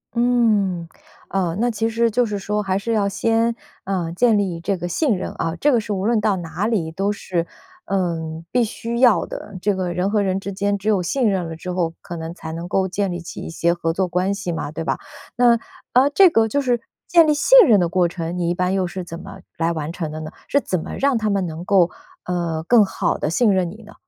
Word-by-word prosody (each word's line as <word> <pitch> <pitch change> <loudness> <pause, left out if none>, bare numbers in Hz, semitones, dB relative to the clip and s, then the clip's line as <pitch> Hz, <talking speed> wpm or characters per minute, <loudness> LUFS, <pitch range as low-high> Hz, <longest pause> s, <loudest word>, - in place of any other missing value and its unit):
嗯。 215 -8 +2 0.4
啊， 180 -4 -1
那 240 +1 +2
其 225 0 -1
实 230 0 +1
就 245 +3 +2
是 210 -2 -3
说 210 +2 -2
还 190 -2 0
是 215 +4 -3
要 210 -3 +2
先， 225 +3 +1 0.3
呃， 180 -4 -2
建 220 +5 +3
立 185 -4 -1
这 195 +4 -1
个 175 -1 -5
信 260 - +1
任 185 - -4
啊， 165 0 -2
这 295 - +4
个 240 - +3
是 210 -1 -3
无 190 0 -2
论 230 0 +3
到 210 -2 +2
哪 180 +3 -3
里 190 -9 -1
都 195 +5 -1
是， 175 -4 -3 0.4
嗯， 165 - -2
必 245 -1 +3
须 230 +2 -4
要 245 -5 +5
的。 200 - -8
这 205 - +2
个 185 -2 -2
人 180 +3 0
和 210 -1 +2
人 190 -1 0
之 200 - -5
间 200 +1 0
只 205 +2 -2
有 205 -4 +3
信 235 +6 +1
任 185 -4 -1
了 165 - -6
之 180 +3 -6
后， 175 -2 -1
可 170 - -7
能 160 0 -6
才 160 - -7
能 165 +2 -5
够 190 +1 +1
建 195 +2 -1
立 175 - -5
起 170 - -8
一 - - -6
些 170 +1 +1
合 165 -1 -2
作 185 +1 -1
关 185 +3 0
系 200 -3 -4
嘛， 160 -2 -4
对 165 - -4
吧？ - - -1 0.4
那， 240 -1 +5 0.4
呃， 260 +3 +5
这 380 +3 +7
个 225 -8 +2
就 285 - +1
是 245 -3 0 0.3
建 335 -2 +6
立 305 - +3
信 - - +6
任 220 - +5
的 175 - +2
过 175 0 +2
程， 170 0 -4
你 170 -1 0
一 - - +1
般 180 +1 0
又 190 -1 +1
是 185 +1 -5
怎 170 -1 -7
么 190 - -10 0.2
来 165 0 +1
完 160 -1 -4
成 165 -4 -4
的 155 - -6
呢？ 155 0 -7 0.2
是 285 - +3
怎 185 - -2
么 - - -7
让 275 -2 +2
他 215 -1 0
们 195 -3 0
能 160 +1 -6
够， 185 -2 +4 0.4
呃， 170 -3 -2
更 240 -3 +6
好 195 - -1
地 - - -2
信 210 +5 +3
任 180 -3 0
你 220 - -12
呢？ 215 - -14
190 Hz, 265 characters per minute, -21 LUFS, 170-225 Hz, 0.4 s, 这